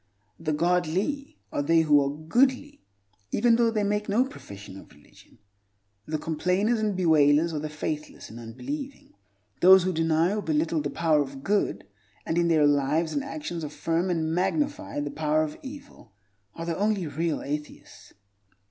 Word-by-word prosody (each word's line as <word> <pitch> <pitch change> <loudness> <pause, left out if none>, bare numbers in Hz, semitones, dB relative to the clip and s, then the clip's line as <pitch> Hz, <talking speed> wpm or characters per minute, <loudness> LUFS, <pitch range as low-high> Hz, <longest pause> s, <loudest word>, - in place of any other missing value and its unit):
The 160 -1 -2
"godly" 180 - 0
are - - -1
they 165 +3 +3
who 145 -3 +4
are 140 - -1
goodly 260 - +1 0.5
even 240 -1 +3
though 235 0 +3
they 215 -2 0
make 210 +1 -1
no 230 +6 +3
profession 100 - -11
of - - -16
religion. - - -21 0.7
The 155 - -1
complainers 180 +9 0
and 210 -3 -1
bewailers 160 -2 +4
are 150 - -2
the 155 +1 -4
faithless 150 0 -5
and 115 - -10
unbelieving. 275 - -7 0.5
Those 190 +1 +8
who 185 0 0
deny 165 +2 +2
or 210 - -1
belittle 160 -1 0
the 145 - -3
power 155 -2 +2
of 135 -1 -6
good, 205 - 0 0.4
and 160 - -1
in 170 - +2
their 160 -3 +4
lives 145 +3 +1
and 285 - -1
actions 275 - -5
affirm 165 +4 -1
and 160 -2 -1
magnify 160 - -1
the 145 0 -4
power 155 0 +1
of 150 -1 -6
evil, 270 - -11 0.4
are 165 - -6
the 170 -1 -2
only 205 -3 +1
real 160 +2 -2
atheists. 150 +1 -7
165 Hz, 165 wpm, -26 LUFS, 150-205 Hz, 0.7 s, Those